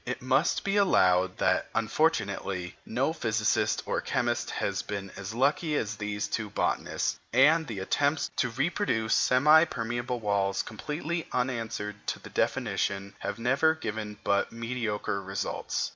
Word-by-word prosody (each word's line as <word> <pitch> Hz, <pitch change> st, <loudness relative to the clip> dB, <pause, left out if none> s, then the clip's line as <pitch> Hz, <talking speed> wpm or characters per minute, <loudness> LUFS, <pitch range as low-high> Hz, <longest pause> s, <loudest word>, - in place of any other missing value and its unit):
It 125 Hz, +1 st, -4 dB
must 135 Hz, +5 st, +1 dB
be 200 Hz, +1 st, 0 dB
allowed 95 Hz, -, +3 dB
that, -, -, +1 dB
unfortunately, 105 Hz, -, 0 dB
no 130 Hz, +7 st, 0 dB
physicist 110 Hz, -7 st, +1 dB
or -, -, -1 dB
chemist -, -, -1 dB
has -, -, -1 dB
been 100 Hz, -2 st, -5 dB
as 100 Hz, +3 st, -6 dB
lucky 150 Hz, +5 st, +1 dB
as 110 Hz, -5 st, -1 dB
these 105 Hz, 0 st, -3 dB
two 110 Hz, -2 st, -3 dB
botanists; -, -, -1 dB
and 155 Hz, +6 st, +5 dB
the 110 Hz, -, -5 dB
attempts 145 Hz, +10 st, 0 dB
to 125 Hz, -, +1 dB
reproduce 135 Hz, -, 0 dB
semi 150 Hz, +5 st, +6 dB
permeable 120 Hz, -2 st, -3 dB
walls 100 Hz, -2 st, 0 dB
completely 155 Hz, +8 st, -4 dB
answering 115 Hz, -5 st, -2 dB
to -, -, -1 dB
the -, -, -12 dB
definition, 100 Hz, 0 st, -1 dB
have 100 Hz, -, -4 dB
never 135 Hz, +7 st, +3 dB
given 105 Hz, -7 st, -5 dB
but 100 Hz, -1 st, +1 dB
mediocre 115 Hz, -3 st, -2 dB
results. 95 Hz, 0 st, -3 dB
115 Hz, 140 wpm, -28 LUFS, 105-140 Hz, -, semi